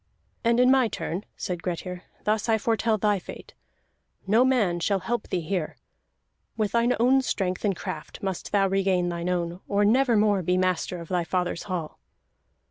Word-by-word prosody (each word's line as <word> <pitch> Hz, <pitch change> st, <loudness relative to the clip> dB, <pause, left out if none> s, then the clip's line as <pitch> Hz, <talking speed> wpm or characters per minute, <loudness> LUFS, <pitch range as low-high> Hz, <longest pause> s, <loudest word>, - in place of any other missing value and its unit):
"And 235 Hz, 0 st, +3 dB
in 250 Hz, +1 st, +6 dB
my 265 Hz, -3 st, +4 dB
turn," 190 Hz, -2 st, -4 dB
said 175 Hz, -2 st, -4 dB
Grettir, 180 Hz, +1 st, -5 dB, 0.2 s
"thus 215 Hz, +2 st, 0 dB
I 220 Hz, -, +4 dB
foretell 225 Hz, 0 st, +1 dB
thy 205 Hz, -1 st, +1 dB
fate. -, -, -11 dB, 0.7 s
No 220 Hz, +5 st, +4 dB
man 220 Hz, -10 st, +2 dB
shall 195 Hz, +2 st, 0 dB
help 240 Hz, +1 st, -2 dB
thee 180 Hz, -, -1 dB
here. 170 Hz, -1 st, -3 dB, 0.8 s
With 215 Hz, -2 st, 0 dB
thine 235 Hz, +1 st, +2 dB
own 260 Hz, +3 st, +4 dB
strength 185 Hz, -7 st, -2 dB
and 200 Hz, -3 st, +1 dB
craft 155 Hz, +1 st, -7 dB
must 190 Hz, -2 st, -4 dB
thou 200 Hz, -1 st, +3 dB
regain 190 Hz, -2 st, +1 dB
thine 170 Hz, +1 st, -3 dB
own, 175 Hz, -1 st, -2 dB
or 205 Hz, 0 st, +2 dB
never 240 Hz, +2 st, +4 dB
more 205 Hz, -2 st, +3 dB
be 180 Hz, +1 st, +1 dB
master 185 Hz, -1 st, 0 dB
of 165 Hz, -, -10 dB
thy 180 Hz, -2 st, +1 dB
fathers 180 Hz, 0 st, -1 dB
hall!" 170 Hz, -4 st, -4 dB
195 Hz, 175 wpm, -26 LUFS, 180-225 Hz, 0.8 s, in